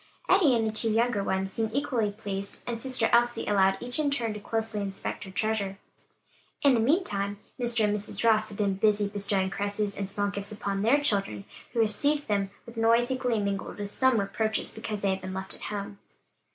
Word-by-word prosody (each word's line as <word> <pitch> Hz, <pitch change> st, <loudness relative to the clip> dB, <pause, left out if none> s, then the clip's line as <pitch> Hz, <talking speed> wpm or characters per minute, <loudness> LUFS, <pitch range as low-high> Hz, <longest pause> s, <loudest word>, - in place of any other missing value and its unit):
Eddie 340 Hz, -10 st, +5 dB
and 225 Hz, -1 st, +1 dB
the 220 Hz, -, 0 dB
two 220 Hz, +1 st, 0 dB
younger 225 Hz, -2 st, +1 dB
ones 190 Hz, 0 st, -1 dB
seemed 225 Hz, -1 st, -1 dB
equally 245 Hz, -7 st, 0 dB
pleased, 200 Hz, -2 st, -5 dB
and 235 Hz, -1 st, -4 dB
"sister 255 Hz, -3 st, +1 dB
Elsie" 240 Hz, 0 st, +3 dB
allowed 195 Hz, -2 st, +3 dB
each 245 Hz, +3 st, -1 dB
in 300 Hz, -2 st, +2 dB
turn 235 Hz, -6 st, -1 dB
to 210 Hz, -, -6 dB
closely 220 Hz, 0 st, -1 dB
inspect, 195 Hz, 0 st, -4 dB
her -, -, -9 dB
treasure. 200 Hz, -1 st, -1 dB, 0.9 s
In 280 Hz, -2 st, +6 dB
the 235 Hz, -, +3 dB
meantime, 215 Hz, -, +1 dB, 0.2 s
Mr. 240 Hz, -2 st, +1 dB
and 210 Hz, 0 st, +2 dB
Mrs. 210 Hz, +2 st, 0 dB
Ross 215 Hz, -1 st, +3 dB
had 205 Hz, -, -9 dB
been 200 Hz, -2 st, +1 dB
busy 205 Hz, 0 st, +2 dB
bestowing 200 Hz, -2 st, 0 dB
caresses 205 Hz, 0 st, -2 dB
and 195 Hz, -1 st, -4 dB
small 205 Hz, 0 st, 0 dB
gifts 200 Hz, +1 st, -1 dB
upon 200 Hz, -2 st, -2 dB
their 235 Hz, +7 st, +4 dB
children, 195 Hz, -, -1 dB, 0.3 s
who 235 Hz, -, -2 dB
received 285 Hz, +7 st, +2 dB
them 200 Hz, -2 st, 0 dB, 0.2 s
with 235 Hz, 0 st, -12 dB
noisy 230 Hz, +3 st, +3 dB
glee 250 Hz, -3 st, 0 dB
mingled 200 Hz, -1 st, -3 dB
with 205 Hz, 0 st, -5 dB
some 260 Hz, -3 st, +3 dB
reproaches 220 Hz, +2 st, -1 dB
because 215 Hz, -2 st, -5 dB
they 195 Hz, -, +3 dB
had 190 Hz, 0 st, -2 dB
been 185 Hz, 0 st, -6 dB
left 190 Hz, 0 st, -5 dB
at -, -, -13 dB
home. 200 Hz, -1 st, -5 dB
210 Hz, 205 wpm, -28 LUFS, 200-235 Hz, 0.9 s, In